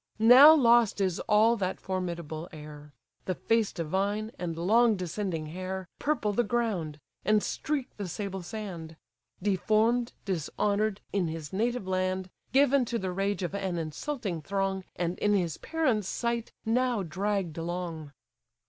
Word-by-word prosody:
Now 255 +8 +9
lost 235 -6 +4
is 185 -3 0
all 220 +2 +5
that 190 -2 -2
formidable 170 -3 -4
air; 150 -2 -11 0.3
The 185 - -1
face 225 +1 +1
divine, 200 +6 -2
and 170 -2 -3
long 220 +6 +4
descending 180 -2 -3
hair, 185 0 -5
Purple 285 -9 0
the 240 - +2
ground, 205 -10 -1 0.2
and 215 -1 +3
streak 295 -4 -3
the 200 -2 -4
sable 195 +1 -4
sand; 175 -5 -7 0.5
Deform'd, 220 +5 +2
dishonour'd, 200 +3 -1
in 195 -4 +1
his 160 -1 -6
native 235 +2 0
land, 185 0 -1 0.2
Given 275 +1 +4
to 235 0 -2
the 190 -4 -3
rage 195 +1 -1
of 175 - -3
an 190 -3 -2
insulting 170 - -4
throng, 195 +2 -2
And, 175 0 -2
in 205 0 +3
his 175 -5 -1
parents' 260 - 0
sight, 235 -1 -2
now 240 -1 +1
dragg'd 185 0 -2
along! 165 -3 -4
195 Hz, 140 wpm, -29 LUFS, 175-225 Hz, 0.5 s, Now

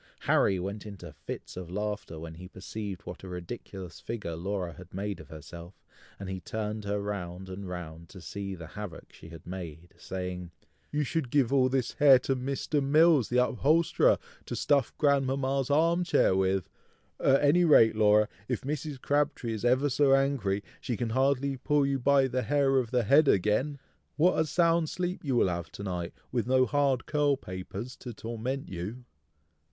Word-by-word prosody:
Harry 95 - +3
went 100 +3 -4
into 90 -6 -9
fits 75 - -8
of 90 -2 -7
laughing 105 -4 -4
when 80 0 -7
he 90 +3 -10
perceived 95 +1 -7
what - - -8
a 95 - -9
ridiculous 90 0 -7
figure 105 -8 -5
Laura 90 0 -3
had 90 +3 -13
made 100 +1 -3
of - - -11
herself, 85 +3 -10 0.4
and 100 - -6
he 95 0 -4
turned 105 +2 -4
her 100 0 -1
round 95 -2 -5
and 95 0 -7
round 85 -2 -7
to 95 - -11
see 95 +2 -5
the 85 -2 -9
havoc 95 0 -9
she 85 - -13
had 80 -1 -12
made, 85 -2 -8
saying, 90 -1 -5 0.4
"You 150 0 0
should 145 -1 -2
give 135 -1 +2
all 130 -2 +4
this 130 -2 0
hair 145 -3 +7
to 135 - 0
Mr. 135 +3 -1
Mills 150 -2 +4
the 125 +1 +4
upholsterer, 155 +7 +3 0.3
to - - -3
stuff 140 -4 +2
grandmama's 135 -2 +1
arm 165 +4 +3
chair 165 - +3
with! 95 -1 +1 0.5
At 135 +1 +3
any 160 +5 +5
rate, 115 -9 +6
Laura, 105 0 +4 0.2
if - - -2
Mrs. 145 0 -4
Crabtree 145 -4 0
is 110 - -5
ever 130 +4 +3
so 135 0 +4
angry, 125 -8 0 0.2
she 120 - -3
can 120 -2 -2
hardly 135 +2 +1
pull 145 +2 +2
you 135 -1 0
by 135 +1 +4
the 130 0 -1
hair 135 -1 +2
of 120 -3 -2
the 125 0 +1
head 140 +7 +5
again! 110 +10 +2 0.4
What 175 +4 +3
a 160 - +3
sound 165 0 +2
sleep 180 0 -3
you 135 -4 0
will 120 - +4
have 85 -2 -3
to 100 - -7
night, 90 -3 -4 0.2
with 120 -2 -1
no 130 0 +4
hard 140 -3 +1
curl 145 -2 +2
papers 100 +4 -7
to 120 -4 -8
torment 120 +5 -4
you!" 100 +8 -6
115 Hz, 180 wpm, -29 LUFS, 95-140 Hz, 0.5 s, hair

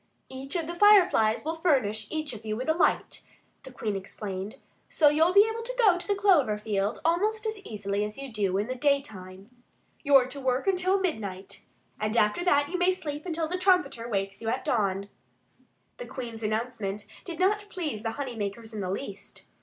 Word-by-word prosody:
"Each 265 +3 -6
of 335 -2 -1
the 340 - -5
Fireflies 350 - +5
will 320 +1 -2
furnish 220 - +1
each 310 -3 -3
of 220 -1 -9
you 215 -1 -3
with 255 +4 -4
a 315 - +4
light," 335 - +1 0.4
the 265 - -12
Queen 220 -4 -3
explained, 195 0 -6 0.3
"so 300 - +5
you'll 320 +4 +3
be 400 +3 +6
able 450 +1 -3
to - - -5
go 425 -7 +5
to 355 - -5
the 405 - +1
clover 345 - +3
field 210 0 -2
almost 420 +7 +1
as 435 -1 -2
easily 205 - -3
as 210 0 -5
you 275 -3 -8
do 195 -3 0
in 205 - 0
the 255 - -2
daytime. 220 -8 -2 0.5
You're 275 -4 +5
to 275 +2 -8
work 260 0 0
until 380 0 +2
midnight. 200 - -4 0.4
And 215 +2 -1
after 210 +10 +2
that 290 -5 +3
you 360 - -2
may 360 +1 +4
sleep 300 -2 -6
until 330 -2 -1
the 365 +3 -3
trumpeter 355 -11 +2
wakes 195 -2 -2
you 225 - -2
at - - -2
dawn." 200 -4 0 0.9
The - - -7
Queen's 235 -3 -7
announcement 215 -2 -3 0.2
did 340 -3 -7
not 410 +3 +2
please 305 - -4
the 225 - -2
honey 265 -3 -5
makers 220 +2 -5
in 210 - -4
the 185 - -3
least. 200 0 -6
260 Hz, 195 wpm, -27 LUFS, 210-350 Hz, 0.9 s, be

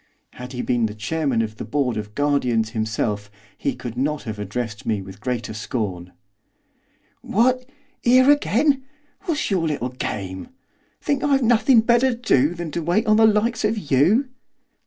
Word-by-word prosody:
Had 125 +1 -9
he 125 - -3
been 120 -3 +1
the 105 - -8
Chairman 130 +1 -1
of 110 -1 -6
the - - -5
Board 140 -5 -1
of 105 0 -6
Guardians 125 -6 +1
himself 110 -2 -2 0.3
he - - -2
could 120 -2 -7
not 150 +4 -1
have 110 -2 -6
addressed 105 +1 -4
me 110 -2 -1
with 95 +1 -11
greater 125 -3 -3
scorn. 100 -5 -4 1.1
'What, 255 +4 +1 0.3
here 255 +3 +6
again! 285 0 +2 0.4
What's 315 - -1
your 175 -4 +1
little 140 -5 -2
game? 95 -7 -5 0.5
Think 285 -2 -1
I've 275 -2 +2
nothing 235 +1 +5
better 240 +2 +3
to - - -16
do 150 - +2
than 170 -2 -5
to 170 - -3
wait 175 +7 +1
upon 215 -2 +3
the 220 0 +6
likes 220 +2 +1
of 215 +1 +1
you? 195 - +3
145 Hz, 165 wpm, -22 LUFS, -, 1.1 s, here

